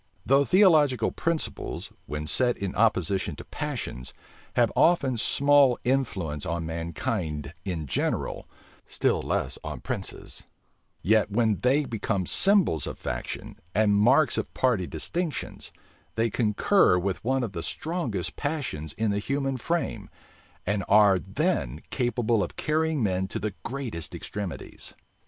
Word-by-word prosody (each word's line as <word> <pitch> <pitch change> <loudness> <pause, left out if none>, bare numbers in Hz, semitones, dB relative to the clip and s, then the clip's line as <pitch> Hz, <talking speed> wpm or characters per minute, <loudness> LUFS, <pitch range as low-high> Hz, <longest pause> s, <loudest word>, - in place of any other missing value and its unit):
Though 140 +2 +4
theological 155 -9 +4
principles, 165 -1 -3 0.2
when 75 +2 -4
set 120 +9 +1
in 100 -2 -3
opposition 95 -4 +1
to - - -10
passions, 60 0 -5 0.4
have - - +3
often 140 -7 +3
small 140 +2 +4
influence 95 - -1
on 85 0 -2
mankind 80 -2 -3
in 85 -5 -3
general, 65 - -2 0.4
still - - +1
less 65 - -2
on - - -6
princes, - - -5 0.6
yet 110 +2 +3
when 110 -1 +1
they 140 +4 +2
become 105 -5 -2
symbols 190 - +3
of - - -5
faction, - - -5 0.2
and 105 -1 +4
marks 125 +7 +4
of - - -4
party 115 -9 +1
distinctions, 160 - -4 0.4
they 115 0 +1
concur 110 - +3
with 95 +1 -2
one 130 +2 +1
of 115 - -3
the 85 - -5
strongest 155 - -3
passions 140 - -3
in 110 -1 0
the 100 - 0
human 135 +4 -1
frame, 165 +7 -2 0.6
and 100 0 0
are 100 -3 +6
then 75 -3 -1
capable 120 -3 +1
of - - -6
carrying 155 -3 0
men 95 -2 0
to - - -4
the 105 0 -3
greatest 120 - -4
extremities. 100 -5 -6
110 Hz, 135 wpm, -27 LUFS, 90-135 Hz, 0.6 s, are